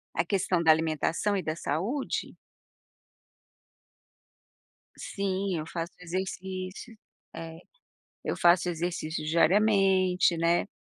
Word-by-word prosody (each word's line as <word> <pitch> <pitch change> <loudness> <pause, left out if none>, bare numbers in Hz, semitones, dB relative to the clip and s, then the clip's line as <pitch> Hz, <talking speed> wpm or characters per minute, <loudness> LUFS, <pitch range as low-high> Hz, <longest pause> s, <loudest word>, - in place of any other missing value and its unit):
A 165 - +2
questão 180 -1 0
da 160 - +2
alimentação 160 +5 +1
e 190 - 0
da 155 -1 -3
saúde? 190 - -2 2.6
Sim, 195 -2 -2
eu 155 - -4
faço 165 +1 -5
exercícios. 185 +4 -5 0.4
É, 165 0 -7 0.7
eu - - -1
faço 175 +1 +4
exercício 165 -2 -3
diariamente, 185 +1 +3
né. 170 +4 +2
180 Hz, 95 wpm, -28 LUFS, 165-190 Hz, 2.6 s, faço